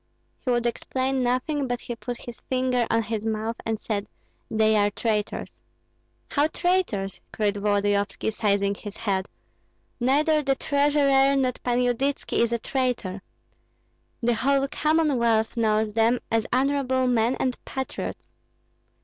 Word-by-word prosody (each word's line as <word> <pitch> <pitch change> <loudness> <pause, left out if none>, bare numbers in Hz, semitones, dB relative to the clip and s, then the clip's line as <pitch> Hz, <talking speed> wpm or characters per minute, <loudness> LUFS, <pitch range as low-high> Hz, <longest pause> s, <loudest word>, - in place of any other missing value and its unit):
"He - - -2
would 240 -1 +1
explain 260 +2 -1
nothing, 255 +3 0
but 245 -1 -2
he 240 - -5
put 245 +1 -5
his 240 -2 -9
finger 255 -2 +1
on 230 0 +2
his 220 0 -3
mouth 220 +1 -2
and 220 -1 -1
said, 205 -2 -3 0.4
'They 220 0 +3
are 205 -1 +4
traitors!'" 210 0 -2 0.7
"How 290 +1 +3
traitors?" 330 - -1
cried 205 -1 0
Volodyovski, 205 +1 0
seizing 200 -2 +1
his 205 0 -9
head. 195 -3 -1 0.7
"Neither 300 +5 +3
the 275 -2 +1
treasurer 280 -1 +3
nor 260 -2 +2
Pan 245 -1 0
Yudytski 260 +3 0
is 235 0 +2
a 235 - +1
traitor. 235 -7 -2 1.0
The 240 +1 +3
whole 275 +4 +2
Commonwealth 270 -8 +2
knows 215 -2 +1
them 225 +2 +3
as 225 -1 +1
honorable 260 0 +1
men 245 0 +2
and 255 -1 -2
patriots." 265 0 -5
240 Hz, 135 wpm, -25 LUFS, 220-270 Hz, 1.0 s, are